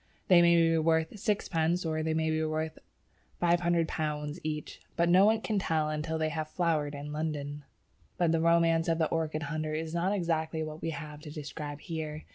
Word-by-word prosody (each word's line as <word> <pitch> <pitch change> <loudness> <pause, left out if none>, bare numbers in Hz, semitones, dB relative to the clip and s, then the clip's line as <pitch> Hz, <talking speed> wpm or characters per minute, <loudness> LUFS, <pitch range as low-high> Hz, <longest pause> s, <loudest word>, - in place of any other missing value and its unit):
They 180 -2 +8
may 170 0 +6
be 165 -1 +4
worth 160 +5 +1
sixpence 175 -4 0
or 155 -1 -1
they 160 0 0
may 160 0 +1
be 155 0 0
worth 155 0 -2 0.6
£500 165 -3 0
each, 150 -1 -4
but 170 0 +2
no 185 +3 +6
one 220 0 +3
can 215 -3 0
tell 155 -4 0
until 155 +1 -2
they 160 0 0
have 155 -1 -3
flowered 155 -4 0
in 145 +1 -6
London. 150 -2 -4 0.5
But 175 -3 +2
the 165 -1 +2
romance 165 0 +3
of 165 -1 +2
the 160 -1 +1
orchid 160 -1 -1
hunter 155 0 -3
is 160 +1 -4
not 175 +3 +1
exactly 165 -4 -1
what 155 0 -7
we 165 - -2
have 150 -2 -6
to 150 0 -10
describe 150 0 -6
here. 155 -2 -5
160 Hz, 190 wpm, -30 LUFS, 155-170 Hz, 0.6 s, They